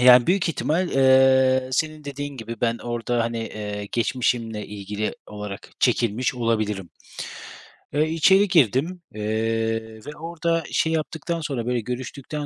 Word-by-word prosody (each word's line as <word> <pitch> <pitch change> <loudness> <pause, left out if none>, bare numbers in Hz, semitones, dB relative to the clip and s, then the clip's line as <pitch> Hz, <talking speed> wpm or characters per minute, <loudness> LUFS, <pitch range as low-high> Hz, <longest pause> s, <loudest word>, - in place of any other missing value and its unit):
E, 125 - +2
yani, 125 -1 +8
büyük 185 -1 +2
ihtimal, 170 +3 0
eee, 130 -1 +5
senin 155 +1 -1
dediğin 145 0 -5
gibi 115 -1 -7
ben 115 -1 +1
orada, 120 0 -1
hani, 115 0 -2
eee, 105 -2 -5
geçmişimle 115 -2 0
ilgili 105 +1 -4
olarak 105 -1 -7
çekilmiş 120 0 +2
olabilirim. 110 -5 -1 1.0
Eee, 155 +2 +2
içeri 190 +5 +5
girdim, 165 - +2
eee, 110 +1 -1
ve 150 0 -8
orada 165 0 -1
şey 160 0 +1
yaptıktan 160 +1 -2
sonra, 135 -6 -3
böyle, 125 -1 0
görüştükten 130 +5 -5
125 Hz, 135 wpm, -24 LUFS, 115-150 Hz, 1.0 s, yani